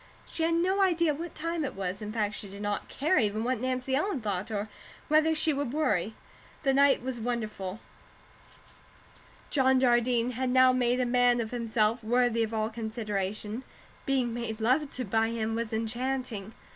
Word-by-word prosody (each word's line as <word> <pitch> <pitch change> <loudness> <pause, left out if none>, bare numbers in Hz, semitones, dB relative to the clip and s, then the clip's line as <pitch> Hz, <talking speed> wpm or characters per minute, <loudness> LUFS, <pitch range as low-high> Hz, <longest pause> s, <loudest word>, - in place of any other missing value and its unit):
She - - -5
had 330 +1 +2
no 375 +4 +2
idea 340 -4 +3
what 330 +3 -7
time 330 0 -2
it 265 -2 -4
was; 195 +1 -3
in 210 0 -5
fact, 215 -2 -1
she 205 - -5
did 200 +1 -8
not 205 0 -2
care 310 +7 +1
even 215 0 0
what 250 -1 -1
Nancy 255 +1 -1
Ellen 310 +1 0
thought 205 -3 -3
or 210 -1 -2 0.4
whether 310 +1 +4
she 310 0 +4
would 280 -3 -2
worry. 215 - 0 0.5
The 270 -2 +3
night 275 -2 +4
was 255 -2 -3
wonderful; 215 -4 -3 1.7
John 265 -2 +4
Jardine 240 -1 +2
had 255 +1 -2
now 255 0 +5
made 250 0 +1
a 250 - +2
man 245 0 +3
of 220 -2 -3
himself 230 -1 0
worthy 240 0 +2
of 225 -1 0
all 220 0 -1
consideration; 215 0 -3 0.4
being 255 -4 +1
made 230 -2 -4
love 260 +6 +2
to 255 - -3
by 225 +2 +1
him 225 -1 -2
was 230 -1 -2
enchanting. 230 -1 -3
240 Hz, 175 wpm, -29 LUFS, 220-265 Hz, 1.7 s, now